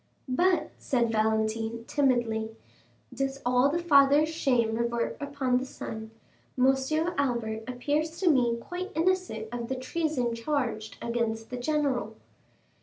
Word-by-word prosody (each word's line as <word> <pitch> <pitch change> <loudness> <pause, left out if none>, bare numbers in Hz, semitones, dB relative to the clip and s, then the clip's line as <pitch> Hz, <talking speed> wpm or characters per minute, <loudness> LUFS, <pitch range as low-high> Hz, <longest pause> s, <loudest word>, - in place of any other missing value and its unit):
"But," 330 +4 +2
said 240 -4 +1
Valentine, 220 +1 0
timidly, 235 -6 +1 0.6
"does 270 0 -2
all 250 +2 +4
the 315 - 0
father's 295 -2 +5
shame 250 -8 +1
revert 235 +1 -1
upon 280 -3 0
the 260 - -4
son? 220 -4 -7 0.5
Monsieur 270 +6 +2
Albert 225 -5 -1
appears 295 +6 -1
to 380 - 0
me 245 -7 +4
quite 360 - -6
innocent 335 -10 0
of 240 -1 -4
the 265 - -2
treason 255 -2 -1
charged 230 -4 -2
against 230 -1 -2
the 250 - -3
general." 255 -5 -1
255 Hz, 125 wpm, -28 LUFS, 230-290 Hz, 0.6 s, father's